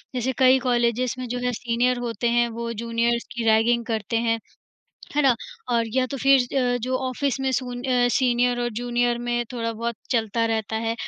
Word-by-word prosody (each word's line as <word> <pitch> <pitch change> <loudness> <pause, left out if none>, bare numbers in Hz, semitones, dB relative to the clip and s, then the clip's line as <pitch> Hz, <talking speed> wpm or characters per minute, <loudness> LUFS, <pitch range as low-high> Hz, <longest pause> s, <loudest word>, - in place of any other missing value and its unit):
जैसे 250 +1 0
कई 260 0 +5
कॉलेजेस 245 -1 +1
में 255 - -4
जो 245 +1 -3
है 250 - +1
सीनियर 245 +2 0
होते 235 -1 -1
हैं 240 0 +3
वो 230 0 -4
जूनियर्स 235 +1 -1
की 235 - -4
रैगिंग 230 +2 +3
करते 225 -1 -2
हैं, 230 0 +1 0.8
है 295 - +4
ना। 265 -3 +5 0.4
और 230 -1 +2
या 260 -1 +3
तो 275 - -5
फिर 275 -1 +6 0.2
अ, 245 -1 +1
जो 255 +2 0
ऑफिस 275 +1 -1
में 265 0 0
सुन 245 -1 -3
अ, 250 -2 +2
सीनियर 245 -1 +2
और 240 - 0
जूनियर 240 0 0
में 240 0 -1
थोड़ा 230 -2 -2
बहुत 235 +1 -3 0.2
चलता 230 -1 +1
रहता 220 -1 -2
है, 225 +1 -1
240 Hz, 195 wpm, -24 LUFS, 230-250 Hz, 0.8 s, फिर